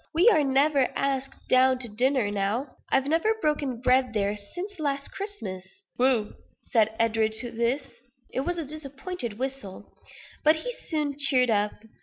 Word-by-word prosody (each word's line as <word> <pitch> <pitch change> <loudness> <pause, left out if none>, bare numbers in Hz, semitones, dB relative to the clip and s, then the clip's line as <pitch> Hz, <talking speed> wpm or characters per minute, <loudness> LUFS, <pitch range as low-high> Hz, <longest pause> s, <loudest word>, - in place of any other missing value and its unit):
We 360 +8 +6
are 315 -10 +4
never 275 0 +3
asked 270 -1 -2
down 255 0 +4
to 250 -1 +3
dinner 240 0 +1
now. 210 +7 -2
I've 270 0 +2
never 330 +9 +2
broken 290 - -1
bread 255 -1 +3
there 205 0 +1
since 355 - -8
last 280 -2 -2
Christmas." 390 - -7
"Whew!" 245 -4 +2 0.3
said 220 -3 +2
Edward 225 -1 +1
to 235 +2 0
this. 235 +2 -2 0.3
It - - -2
was 350 +6 -2
a 330 - -3
disappointed 275 - -6
whistle; 260 -7 -6 0.5
but 310 +1 +6
he - - -4 0.2
soon 295 -3 -1
cheered 255 -4 +5
up. 210 -1 +1
265 Hz, 155 wpm, -26 LUFS, 230-300 Hz, 0.5 s, We